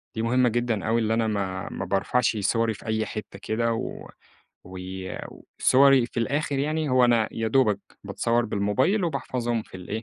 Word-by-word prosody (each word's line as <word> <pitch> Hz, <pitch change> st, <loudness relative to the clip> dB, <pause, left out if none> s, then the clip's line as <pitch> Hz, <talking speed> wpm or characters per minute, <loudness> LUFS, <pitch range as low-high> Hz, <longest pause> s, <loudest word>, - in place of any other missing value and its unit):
دي 110 Hz, -, -2 dB
مهمّة 125 Hz, +1 st, +3 dB
جدًا 120 Hz, -3 st, -1 dB
أوي 115 Hz, +1 st, +2 dB
اللي 110 Hz, 0 st, +1 dB
أنا 115 Hz, -1 st, +1 dB
ما 95 Hz, -3 st, -2 dB
ما 95 Hz, -, -4 dB
بارفعش 105 Hz, +5 st, +1 dB
صوَري 115 Hz, +2 st, +1 dB
في -, -, -14 dB
أي 110 Hz, 0 st, 0 dB
حتّة 105 Hz, -2 st, -7 dB
كده، 115 Hz, +1 st, 0 dB
و 115 Hz, -, -5 dB, 0.6 s
و 95 Hz, 0 st, -9 dB, 0.8 s
صوَري 135 Hz, -2 st, +5 dB
في 120 Hz, -, -4 dB
الآخر 140 Hz, +2 st, -1 dB
يعني 155 Hz, +1 st, -1 dB
هو 130 Hz, -1 st, +5 dB
أنا 115 Hz, -2 st, +3 dB
يا 115 Hz, 0 st, -2 dB
دوبك 115 Hz, -4 st, +3 dB, 0.3 s
باتصوَّر 120 Hz, 0 st, 0 dB
بالموبايل 130 Hz, -, +1 dB
وباحفظهم 120 Hz, -7 st, -2 dB
في 95 Hz, -, -12 dB
الإيه، 105 Hz, +5 st, -5 dB
115 Hz, 175 wpm, -25 LUFS, 110-130 Hz, 0.8 s, صوَري